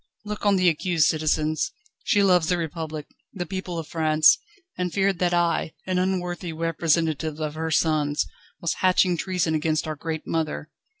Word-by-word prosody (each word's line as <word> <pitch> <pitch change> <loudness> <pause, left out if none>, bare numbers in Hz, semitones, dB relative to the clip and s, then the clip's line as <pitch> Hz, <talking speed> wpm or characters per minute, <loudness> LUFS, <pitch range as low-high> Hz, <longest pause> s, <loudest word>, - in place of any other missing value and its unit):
Look 210 0 -3
on 200 - +5
the 185 -1 +3
accused, 165 -1 +2
citizens. 155 0 +1 0.3
She 205 -4 +3
loves 180 -4 +4
the 180 - +2
Republic, 160 -2 -4 0.3
the 180 -3 -4
people 185 -1 -5
of 165 - -4
France, 155 -1 +4 0.4
and 180 -1 -2
feared 195 -1 +1
that 180 -1 +2
I, 170 -2 +1
an 185 -1 0
unworthy 180 -2 -2
representative 160 -1 0
of 155 -1 -2
her 160 +1 -3
sons, 155 -2 +1 0.3
was 170 - 0
hatching 185 -1 +4
treason 175 -2 -1
against 155 0 0
our 155 - -3
great 160 +1 -5
mother. 155 -1 -2
165 Hz, 165 wpm, -25 LUFS, 155-180 Hz, 0.4 s, on